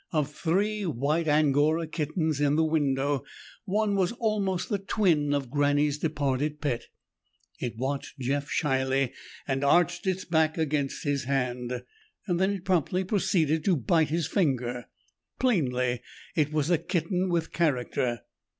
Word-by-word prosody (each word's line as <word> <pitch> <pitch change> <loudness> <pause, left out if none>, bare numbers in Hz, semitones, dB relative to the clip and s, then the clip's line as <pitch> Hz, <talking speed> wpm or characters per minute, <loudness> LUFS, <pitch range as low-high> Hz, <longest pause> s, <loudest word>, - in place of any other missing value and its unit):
Of 150 -2 0
three 200 +6 0
white 155 +1 0
Angora 150 +2 +3
kittens 155 -1 -1
in 145 0 +3
the 160 - +3
window, 145 -3 +1 0.4
one 210 +1 +1
was 190 +1 +1
almost 200 -6 -1
the 205 - 0
twin 180 -7 +1
of 140 -4 -1
Granny's 145 0 +2
departed 145 -1 -1
pet. 135 -6 -2 0.7
It 120 -2 -4
watched 135 +3 -3
Jeff 140 +2 -2
shyly, 130 -2 +1 0.3
and 135 0 -1
arched 175 +7 +3
its 190 0 -1
back 160 -2 +2
against 145 -3 -1
his 140 -2 -1
hand. 125 -2 -2 0.4
Then 185 +1 +2
it 195 -2 -4
promptly 180 0 +1
proceeded 165 -5 +1
to 190 - +4
bite 160 +3 +2
his 165 +1 0
finger. 125 - 0 0.5
Plainly 125 - +1 0.3
it 150 -2 +1
was 155 +1 0
a 170 - +4
kitten 180 +2 -1
with 170 -2 0
character. 125 -6 0
150 Hz, 140 wpm, -27 LUFS, 140-175 Hz, 0.7 s, to